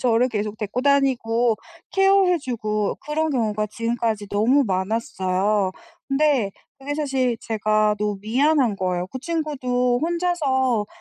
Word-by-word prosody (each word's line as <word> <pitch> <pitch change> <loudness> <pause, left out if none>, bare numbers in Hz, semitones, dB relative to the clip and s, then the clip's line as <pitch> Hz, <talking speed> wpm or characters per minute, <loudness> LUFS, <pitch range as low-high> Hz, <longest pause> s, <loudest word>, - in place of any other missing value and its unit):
저를 245 0 +3
계속 210 -1 -3
데리고 215 +4 -3
다니고 245 -5 +2 0.4
Care 390 -1 +4
해 350 - +2
주고 215 -7 -2
그런 315 +1 -1
경우가 215 -5 0
지금까지 230 -3 -2
너무 250 +7 +3
많았어요. 190 0 0 0.4
근데 275 -7 +2 0.3
그게 285 +2 -4
사실 270 -5 0
제가 215 -1 +1
너무 210 -1 -1
미안한 255 +1 +2
거예요. 180 -1 -1
그 260 - -6
친구도 255 -5 -1
혼자서 290 -10 +1
240 Hz, 300 characters per minute, -23 LUFS, 210-280 Hz, 0.4 s, Care